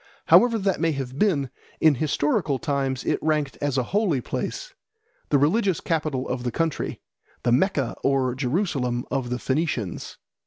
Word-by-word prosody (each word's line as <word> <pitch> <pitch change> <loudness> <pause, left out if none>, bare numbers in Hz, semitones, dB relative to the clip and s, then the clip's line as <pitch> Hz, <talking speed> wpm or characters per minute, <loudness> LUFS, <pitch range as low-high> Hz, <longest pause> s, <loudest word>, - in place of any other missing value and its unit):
However 240 -2 +6
that 195 -2 0
may 165 -1 +1
have 135 0 -5
been, 145 -11 +2 0.3
in 160 -2 +5
historical 145 0 0
times 135 -4 -1
it - - +1
ranked 150 -3 0
as 145 -2 0
a 130 - +2
holy 200 -9 +2
place, - - -4 0.6
the 145 - +4
religious 180 +5 +2
capital 155 -5 -1
of 125 -1 -2
the 120 - -1
country, 165 +2 -2 0.4
the 120 - +2
Mecca 140 - +1
or 135 -2 +2
Jerusalem 130 -3 -1
of 130 -3 -1
the 125 - -1
Phoenicians. 130 - -2
140 Hz, 155 wpm, -24 LUFS, 130-165 Hz, 0.6 s, However